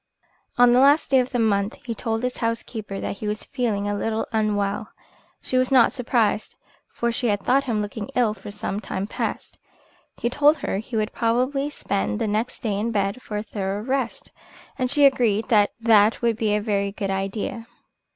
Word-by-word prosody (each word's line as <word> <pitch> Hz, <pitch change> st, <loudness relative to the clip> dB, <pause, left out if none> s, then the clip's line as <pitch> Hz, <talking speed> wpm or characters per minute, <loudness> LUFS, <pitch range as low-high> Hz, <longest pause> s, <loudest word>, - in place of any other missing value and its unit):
On 245 Hz, 0 st, +6 dB
the 250 Hz, -, +5 dB
last 285 Hz, +3 st, +4 dB
day 265 Hz, -, +6 dB
of 250 Hz, 0 st, 0 dB
the 250 Hz, -, -2 dB
month 205 Hz, -2 st, +1 dB
he 235 Hz, -, -2 dB
told 225 Hz, +1 st, -3 dB
his 250 Hz, 0 st, -2 dB
housekeeper 225 Hz, -3 st, -3 dB
that -, -, -4 dB
he 215 Hz, -, -4 dB
was 210 Hz, 0 st, -3 dB
feeling 225 Hz, -7 st, -2 dB
a 205 Hz, -, -1 dB
little 220 Hz, +2 st, -1 dB
unwell. 210 Hz, -1 st, 0 dB, 0.5 s
She 255 Hz, -, 0 dB
was 255 Hz, +1 st, +1 dB
not 255 Hz, -3 st, +6 dB
surprised, 230 Hz, -4 st, 0 dB, 0.4 s
for 235 Hz, 0 st, -1 dB
she 240 Hz, +1 st, -1 dB
had 205 Hz, -2 st, 0 dB
thought 275 Hz, +2 st, +2 dB
him 220 Hz, -5 st, 0 dB
looking 205 Hz, 0 st, -6 dB
ill 235 Hz, -4 st, +2 dB
for 215 Hz, -, -10 dB
some 205 Hz, -1 st, -3 dB
time 190 Hz, -2 st, -4 dB
past. -, -, -4 dB, 0.6 s
He -, -, -1 dB
told 290 Hz, +5 st, +4 dB
her 195 Hz, -, -2 dB
he 225 Hz, +3 st, -7 dB
would 215 Hz, 0 st, -1 dB
probably 255 Hz, +5 st, 0 dB
spend 200 Hz, -7 st, -2 dB
the 225 Hz, -, -1 dB
next 215 Hz, +3 st, -2 dB
day 205 Hz, -3 st, -1 dB
in 225 Hz, +3 st, -1 dB
bed 200 Hz, +3 st, -1 dB
for 210 Hz, -, -5 dB
a 210 Hz, -, -3 dB
thorough 200 Hz, -1 st, -3 dB
rest, 260 Hz, -1 st, -2 dB, 0.4 s
and 255 Hz, -2 st, -1 dB
she 285 Hz, +2 st, +4 dB
agreed 235 Hz, -5 st, +2 dB
that 210 Hz, -4 st, +4 dB
that 220 Hz, -1 st, +4 dB
would 230 Hz, -1 st, +2 dB
be 215 Hz, -1 st, 0 dB
a 210 Hz, -, 0 dB
very 200 Hz, -2 st, 0 dB
good 200 Hz, -1 st, -3 dB
idea. 195 Hz, +4 st, -3 dB
225 Hz, 200 wpm, -23 LUFS, 205-245 Hz, 0.6 s, On